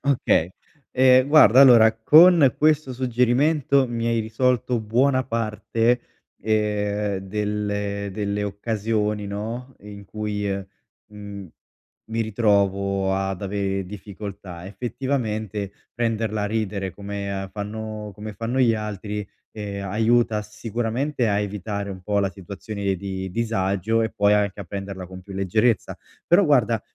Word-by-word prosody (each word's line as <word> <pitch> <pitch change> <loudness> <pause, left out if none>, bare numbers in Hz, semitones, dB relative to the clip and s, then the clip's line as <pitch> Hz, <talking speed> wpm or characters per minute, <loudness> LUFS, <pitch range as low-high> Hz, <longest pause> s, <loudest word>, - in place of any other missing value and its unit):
Okay. 125 - +2 0.4
Ehm, 130 0 +5
guarda, 145 -4 +7
allora, 115 -5 +8
con 155 +4 +6
questo 155 -3 +2
suggerimento 130 +3 +2
mi 115 -1 -2
hai 115 -1 +1
risolto 120 +2 0
buona 130 +4 +2
parte, 115 +1 0 0.4
ehm, 105 -2 0
delle 100 0 -3
delle 105 0 -2
occasioni, 105 0 -2
no, 115 +6 -5
in 100 0 -11
cui, 105 0 -3
uhm, 100 0 -3 0.4
mhmm, 100 -3 -9 0.6
mi 115 +1 -1
ritrovo 100 -3 +1
ad 95 0 -2
avere 95 -1 -2
difficoltà. 100 -2 -8
Effettivamente, 110 -3 -3 0.2
prenderla 115 -3 -1
a - - 0
ridere 100 -3 -2
come 100 -1 -5
fanno 105 0 -6
come 105 +2 -7
fanno 115 +5 -2
gli 115 -3 +4
altri, 105 -1 -5 0.2
ehm, 100 -2 -6
aiuta 115 +1 +2
sicuramente 115 +5 -2
a 100 0 +1
evitare 100 0 -4
un 95 -1 -8
po' 100 +2 0
la 100 -1 0
situazione 100 +1 -4
di 95 0 -5
disagio, 110 0 0
e 110 - -1
poi 100 -2 +2
anche 105 -1 +1
a - - -6
prenderla 95 0 -6
con 95 +1 -10
più 100 +1 -11
leggerezza. 100 +4 0 0.3
Però 185 +4 +5
guarda, 120 - +3
105 Hz, 125 wpm, -23 LUFS, 100-115 Hz, 0.6 s, allora